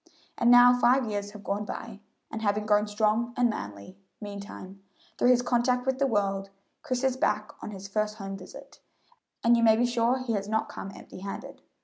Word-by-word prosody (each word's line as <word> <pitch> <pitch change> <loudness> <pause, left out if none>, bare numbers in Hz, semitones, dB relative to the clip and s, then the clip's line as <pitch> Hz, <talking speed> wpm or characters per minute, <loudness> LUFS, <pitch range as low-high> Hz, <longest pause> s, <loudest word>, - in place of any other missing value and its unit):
And 235 - +2
now 245 0 +7
five 250 +2 +4
years 205 -1 -3
have 205 0 -12
gone 200 +1 -2
by, 210 0 -7 0.3
and 220 - -5
having 210 0 0
grown 210 0 +3
strong 215 +3 0
and 245 -2 +3
manly, 100 - -8 0.2
meantime, 200 -2 -9 0.4
through 245 - +4
his 245 -1 +4
contact 250 +1 +1
with 265 0 0
the 275 - +3
world, 195 -4 0 0.3
Chris 255 0 -2
is 265 -1 +2
back 210 -4 0
on - - -6
his 195 -1 -8
first 215 +1 -1
home 195 -2 -6
visit, 200 +9 -12 0.6
and 235 +1 +5
you 235 - +2
may 225 -1 +6
be 240 +2 +2
sure 240 +1 +1
he 255 -3 -3
has 200 -1 -2
not 220 0 0
come 195 - -7
empty - - -11
handed. 195 +1 -7
215 Hz, 200 wpm, -28 LUFS, 200-245 Hz, 0.6 s, now